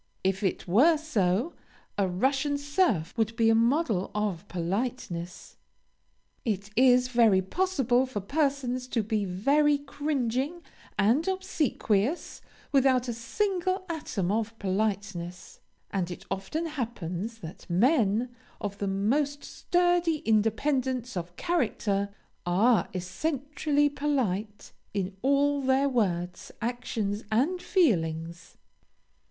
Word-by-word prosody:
If 190 +1 0
it 190 -2 -1
were 275 - +5
so, 235 - 0 0.4
a 200 -2 +1
Russian 270 +10 +1
serf 285 - 0
would 225 0 +1
be 225 0 +4
a - - +5
model 230 - +2
of 205 -3 -2
politeness. 180 -1 -4 0.9
It 205 -2 -2
is 250 0 +5
very 225 -6 +4
possible 265 - +1
for 255 -5 -4
persons 255 +1 -1
to 235 -3 0
be 210 -1 -1
very 285 +11 +3
cringing 285 +2 -2 0.3
and 240 - +3
obsequious, 315 - -1 0.3
without 260 -2 +3
a - - -1
single 370 - -1
atom 210 - -2
of 225 +1 -1
politeness; 190 -3 -3 0.3
and 185 -3 -1
it 180 +2 -8
often 195 - -2
happens 225 - -4
that 165 +3 -10
men 225 - +3 0.3
of 200 -1 -5
the 200 - -1
most 275 +10 0
sturdy 350 -3 +1
independence 245 +3 +1
of 175 0 -5
character, 210 - 0 0.3
are 205 +7 +3
essentially 290 - 0
polite 240 -9 -2 0.2
in 190 -1 -2
all 280 +1 +2
their 265 +1 +3
words, 180 -9 -1
actions, 225 -3 -2
and 300 +12 +1
feelings. 170 - 0
235 Hz, 110 wpm, -28 LUFS, 195-285 Hz, 0.9 s, were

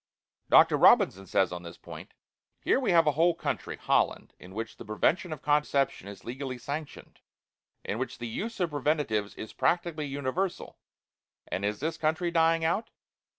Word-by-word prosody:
Dr. - - +6
Robinson 95 +1 +5
says 95 - +2
on 90 -1 -5
this 85 -1 -10
point: - - -11 0.4
"Here - - +2
we 265 - -1
have 170 -3 +5
a 150 - +4
whole 165 +4 +3
country, - - -4
Holland, - - 0
in 95 +2 -13
which 115 +1 -5
the - - -9
prevention 160 - 0
of 155 - -6
conception 145 -7 +1
is 100 -1 -10
legally 130 +1 -5
sanctioned, 145 +4 -7 0.7
in 105 - -3
which 130 - -4
the 120 - -5
use 220 - -5
of 175 -3 0
preventives 145 -8 -1
is 110 - -8
practically 155 +2 0
universal 140 +7 -3 0.7
and 95 - -3
is 105 +2 -2
this 160 +1 -2
country 160 +2 0
dying 165 -1 +3
out? 195 +7 0
145 Hz, 165 wpm, -28 LUFS, 115-165 Hz, 0.7 s, Dr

